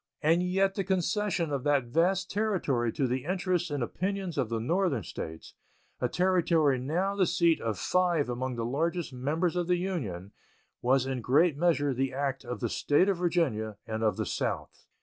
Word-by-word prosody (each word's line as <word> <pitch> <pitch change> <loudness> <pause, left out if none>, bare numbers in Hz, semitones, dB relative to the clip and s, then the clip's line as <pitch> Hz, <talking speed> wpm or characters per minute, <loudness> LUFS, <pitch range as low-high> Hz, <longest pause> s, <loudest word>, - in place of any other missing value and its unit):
And 165 +3 +4
yet 195 +2 +1
the 195 - -1
concession 185 -2 0
of 140 -3 -2
that 145 -2 +3
vast 175 +9 +1
territory 175 - 0
to 140 - 0
the 130 +1 -1
interests 180 0 -1
and 145 -4 -2
opinions 190 +5 -3
of 130 -6 0
the 115 -1 -1
Northern 160 - 0
States, 80 -1 -7 0.5
a 125 - 0
territory 170 -6 +2
now 175 +10 -1
the 190 -3 +2
seat 170 -2 +2
of 110 -4 -2
five 175 - +1
among 125 +1 -3
the 115 -1 -2
largest 165 +5 -1
members 155 +8 -1
of 175 -1 -1
the 180 0 +2
Union, 115 - -4 0.5
was 130 +1 +3
in 130 -2 -3
great 145 +7 +3
measure 145 -3 +2
the 130 +1 -1
act 135 -1 -2
of 125 0 -6
the 120 - +1 0.2
State 150 +7 +4
of 195 - +1
Virginia 140 - 0
and 110 0 -4
of 110 -1 +1
the - - -1
South. - - -4
155 Hz, 185 wpm, -29 LUFS, 125-180 Hz, 0.5 s, And